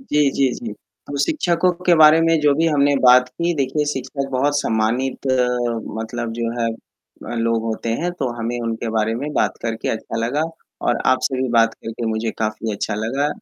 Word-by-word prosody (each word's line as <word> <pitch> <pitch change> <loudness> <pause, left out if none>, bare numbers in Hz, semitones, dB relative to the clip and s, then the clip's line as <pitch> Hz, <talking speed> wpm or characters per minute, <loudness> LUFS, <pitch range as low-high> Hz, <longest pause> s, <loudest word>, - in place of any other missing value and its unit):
जी, 150 - +2
जी, 135 -1 +2
जी। 115 -3 -6 0.3
तो 145 - -5
शिक्षकों 175 - +2 0.2
के 175 - +6
बारे 155 +1 +7
में 165 0 +3
जो 145 -1 +4
भी 165 +3 +2
हमने 145 -2 +3
बात 125 0 +7
की 170 +6 -1
देखिए 145 +1 0
शिक्षक 135 +1 -4
बहुत 140 +3 +1
सम्मानित 115 +5 -1 0.7
मतलब 115 +1 -4
जो 115 0 -2
है 115 - +1 0.6
अ, - - -3
लोग 115 -1 +1
होते 115 0 -3
हैं, 175 - 0
तो 140 -8 -2
हमें 120 +1 -2
उनके 115 0 -3
बारे 110 +1 +1
में 140 +6 -4
बात - - 0
करके 115 -1 -3
अच्छा 115 0 -3
लगा 145 +6 0 0.4
और 120 - +2
आपसे 130 0 +1
भी 130 - -1
बात 115 0 +3
करके 115 +1 -6
मुझे 110 0 -1
काफ़ी 110 0 -2
अच्छा 105 +1 -3
लगा। 125 +7 -1
125 Hz, 190 wpm, -20 LUFS, 115-145 Hz, 0.7 s, बारे